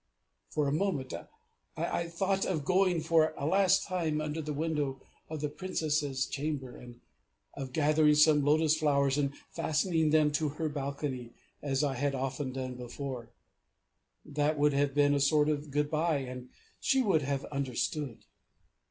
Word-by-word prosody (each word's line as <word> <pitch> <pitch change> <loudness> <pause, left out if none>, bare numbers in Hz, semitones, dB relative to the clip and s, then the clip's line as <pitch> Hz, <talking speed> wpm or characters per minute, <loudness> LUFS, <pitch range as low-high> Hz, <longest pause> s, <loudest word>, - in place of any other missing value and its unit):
For 150 -2 0
a - - +1
moment 155 -6 -1 0.6
I 170 - -1
thought 190 +3 0
of 155 -6 -1
going 185 -1 +3
for 160 -1 +3
a 140 - -3
last 190 +3 +4
time 165 -5 -1
under 155 +1 -3
the 155 0 -4
window 150 -3 -1 0.3
of 155 -2 -5
the 150 - 0
Princess's 150 -5 -1
chamber, 140 -3 -4
and 120 -1 -12 0.5
of 135 -2 -6
gathering 150 +1 +4
some 150 -1 +5
lotus 155 +2 +4
flowers 140 -3 +2
and 140 -1 -1 0.2
fastening 160 0 +1
them 150 -1 +4
to 150 +1 0
her 160 -2 -1
balcony, 140 -4 -4 0.3
as 135 0 0
I 140 -2 +1
had 140 +2 -1
often 135 +1 -3
done 130 -1 -4
before; 125 -1 -6 1.0
that 150 +1 0
would 145 0 +3
have 140 0 +1
been 145 0 +4
a 140 - +2
sort 150 +2 +3
of 150 0 -2
"good 145 +1 0
bye" 160 0 +1
and 125 -2 -6 0.3
she 265 -1 +2
would 185 -8 +3
have 140 0 -2
understood. 140 -1 -3
150 Hz, 160 wpm, -31 LUFS, 140-155 Hz, 1.0 s, some